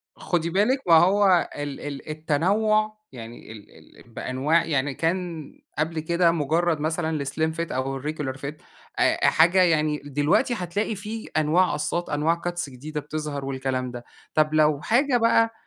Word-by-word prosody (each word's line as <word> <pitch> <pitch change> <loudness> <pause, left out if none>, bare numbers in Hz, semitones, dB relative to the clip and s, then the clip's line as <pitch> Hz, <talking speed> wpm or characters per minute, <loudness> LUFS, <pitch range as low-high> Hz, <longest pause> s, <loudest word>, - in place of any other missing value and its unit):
خدي 170 -1 -1
بالِك 210 +9 +2
ما 170 - +5
هو 190 0 +4
ال 145 -1 -5
ال 145 0 -7
التنوع، 205 +8 +1
يعني 115 -2 -10
ال 110 -2 -15
ال - - -22
بأنواع 145 +8 0
يعني 145 -2 0
كان 165 0 -2 0.3
قبل 155 +1 -1
كده 170 +2 +2
مجرد 165 +1 0
مثلًا 160 +2 -1
الاسليم 155 +1 -1
فِت 165 +1 -4
أو 130 +1 -2
الريجيولار 145 -2 -4
فِت 140 +2 -6 0.4
أ - - +3
حاجة 175 +4 +4
يعني 155 -3 +2
دلوقتي 145 - +1
هتلاقي 200 +5 -2
فيه 215 +3 -7
أنواع 160 +4 +3
قصات، 155 +4 -2
أنواع 160 +3 0
cuts 175 -4 -3
جديدة 150 +4 -6
بتظهر 150 -1 -5
والكلام 130 -1 -3
ده. 120 0 -8 0.3
طب 155 0 +2
لو 150 -2 +3
حاجة 245 - +2
بقى 230 -1 +3
155 Hz, 155 wpm, -24 LUFS, 145-175 Hz, 0.4 s, ما